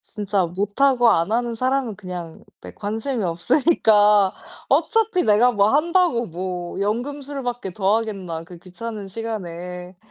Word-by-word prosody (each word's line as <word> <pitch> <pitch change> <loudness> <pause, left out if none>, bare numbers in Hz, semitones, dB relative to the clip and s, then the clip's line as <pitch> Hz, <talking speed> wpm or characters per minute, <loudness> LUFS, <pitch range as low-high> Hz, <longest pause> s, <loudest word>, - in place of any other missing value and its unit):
진짜 205 -3 -1
못하고 230 +7 +2
안하는 230 +7 +1
사람은 255 -2 -1
그냥 180 -5 -8 0.2
네 - - -11
관심이 220 +4 -3
없으니까 210 - +3 0.4
'어차피 445 -5 +2
내가 225 +4 +4
뭐 205 -1 +3
한다고 330 -6 +2
뭐 180 +1 -5
연금술밖에 245 0 -3
더 195 +3 +2
하겠나 190 -7 -5
그 175 0 -12
귀찮은 205 +3 -7
시간에.' 180 -4 -6
210 Hz, 280 characters per minute, -22 LUFS, 185-245 Hz, 0.4 s, 내가